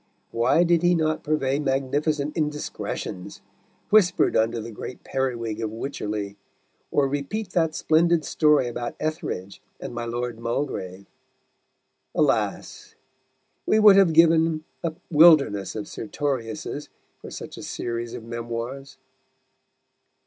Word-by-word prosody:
Why 120 +9 +3
did 170 -1 +3
he 175 0 +4
not 155 -1 0
purvey 140 -2 0
magnificent 145 +2 -1
indiscretions 150 - -4 0.5
whispered 210 -4 +4
under 115 +1 +2
the 115 +1 -7
great 120 +3 -8
periwig 115 -4 -2
of 110 - -2
Wycherley, 105 -4 -4 0.5
or 140 -1 +2
repeat 145 +9 -3
that 160 -3 +1
splendid 165 0 +2
story 150 -4 +3
about 120 0 -5
Etheredge 155 - -4 0.2
and - - -7
my 120 0 -4
Lord 120 0 -4
Mulgrave? 115 -6 -3 1.1
Alas! - - -1 0.7
we 215 - +4
would 210 -2 +8
have 195 -4 +5
given 160 -1 +4 0.2
a 165 -2 -2 0.2
wilderness 145 - +5
of 105 - -4
Sertoriuses 135 +4 -4 0.3
for - - -10
such - - -8
a - - -9
series 120 0 -4
of - - -8
memoirs. 120 +4 -6
140 Hz, 120 wpm, -24 LUFS, 115-160 Hz, 1.1 s, would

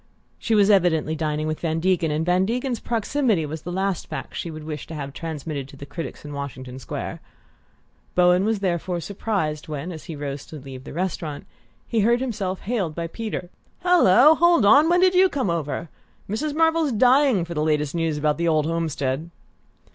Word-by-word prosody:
She 225 - +1
was 205 0 +5
evidently 160 -5 +3
dining 155 -1 -2
with 155 0 -2
Van 165 -1 -1
Degen, 175 -2 +1
and 155 +2 -1
Van 180 +1 +3
Degen's 245 +3 -1
proximity 230 - 0
was 155 +1 -6
the 175 - -6
last 190 -1 -1
fact - - -6
she 170 - -4
would 155 -1 -8
wish 150 -1 -6
to 165 - -7
have 140 -2 -5
transmitted 155 -3 -5
to 140 - -14
the 140 - -8
critics 155 +2 -7
in 145 - -7
Washington 130 -2 -6
Square. 125 - -6 0.9
Bowen 180 +1 +4
was 215 -1 0
therefore 175 -1 -1
surprised 175 -5 -3
when, 155 +3 -5
as 160 -3 -9
he 160 - -6
rose 145 -1 -5
to - - -10
leave 130 -2 -9
the - - -8
restaurant, 165 -2 -3 0.4
he 230 - 0
heard 235 +3 +3
himself 205 -7 -3
hailed 195 -9 -2
by 170 - -3
Peter. 185 -1 -5 0.3
"Hallo 310 - +6
hold 340 -7 +4
on! 285 +10 +6
When 355 +1 +4
did 370 0 +5
you 370 +1 +5
come 260 - -1
over? 165 0 -3 0.4
Mrs. 290 +9 -2
Marvell's 325 -2 +3
dying 250 -4 +4
for 170 - -6
the 150 - -1
last 150 -2 0
news 165 -3 -1
about 150 +1 0
the 170 - +1
old 155 -2 +2
homestead." 160 -2 -2
170 Hz, 195 wpm, -23 LUFS, 155-220 Hz, 0.9 s, Hallo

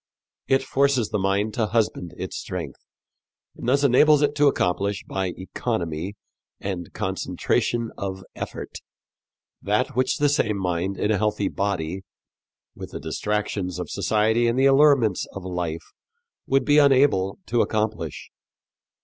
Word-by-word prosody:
It 135 0 +3
forces 135 -4 +1
the 105 - -1
mind 100 +3 0
to 110 -1 0
husband 105 -6 -1
its - - -5
strength, 85 -7 -5 0.8
and 120 - -4
thus 140 +2 +3
enables 150 +3 +5
it 145 0 +2
to 145 0 +5
accomplish 100 -4 0
by 95 -1 -2
economy 95 -3 -3 0.4
and 90 -4 -5
concentration 110 +4 -1
of 95 -1 -4
effort - - -6 0.8
that - - 0
which 130 0 +1
the 145 - +3
same 110 -7 +1
mind 90 +1 -1
in 105 - 0
a 105 - +1
healthy 105 -1 0
body, 95 -2 -2 0.7
with - - -9
the - - -7
distractions 95 +2 -2
of - - -5
society 110 +2 +2
and 115 +2 +1
the 135 - +4
allurements 135 -7 +4
of 100 -2 -7
life, 85 -3 -4 0.6
would 135 0 +2
be 145 0 +5
unable 135 -9 +4
to 120 - +1
accomplish. 105 -7 -2
105 Hz, 140 wpm, -24 LUFS, 95-125 Hz, 0.8 s, enables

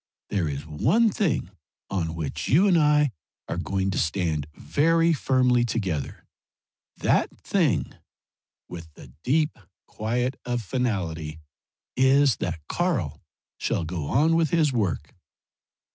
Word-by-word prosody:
There 95 -6 0
is 70 +1 -5
one 150 - +2
thing 170 - -1 0.4
on 85 -4 -2
which 80 -4 -4
you 180 +9 +5
and 185 - +4
I 150 -3 +4 0.4
are - - -3
going 95 +2 -1
to - - -1
stand 80 -3 -1
very 165 +2 +2
firmly 125 -4 +2
together. 95 -11 -3 0.7
That - - +2
thing," - - +1 0.7
with 85 -2 -9
the 65 -3 -14
deep 150 0 +1 0.3
quiet 125 +4 -2
of 120 -1 -2
finality 90 -10 -2 0.6
"is 135 0 +4
that 80 -4 -4
Karl - - -1 0.4
shall - - -1
go 80 -2 -4
on 155 - +3
with 165 -2 +2
his 155 -4 +2
work." 105 -9 -1
115 Hz, 125 wpm, -25 LUFS, -, 0.7 s, you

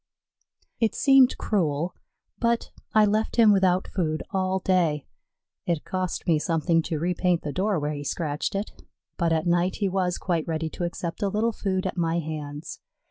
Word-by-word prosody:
It 225 -3 +1
seemed 270 -2 +5
cruel, 170 -4 0 0.5
but 235 0 0 0.2
I 215 -1 +5
left 215 +2 0
him 225 -3 +6
without 185 -1 +2
food 155 -5 -1
all 190 -1 0
day. 175 -6 +1 0.6
It 170 -3 -1
cost 185 -2 -3
me 160 -3 +3
something 165 +1 +1
to 160 - -1
repaint 175 +1 0
the 145 - -4
door 200 +1 +1
where 150 +1 -2
he 145 -1 -5
scratched 150 +3 -2
it, 200 +2 -2 0.5
but 170 -2 +1
at 160 +1 +1
night 175 +1 +2
he 205 - 0
was 180 -2 0
quite 170 -4 -1
ready 160 -1 -2
to 175 - -3
accept 170 0 -5
a 200 - +1
little 215 +4 +1
food 190 -3 -2
at 185 - -3
my 165 -1 +1
hands. 150 -1 -5
180 Hz, 175 wpm, -26 LUFS, 160-195 Hz, 0.6 s, him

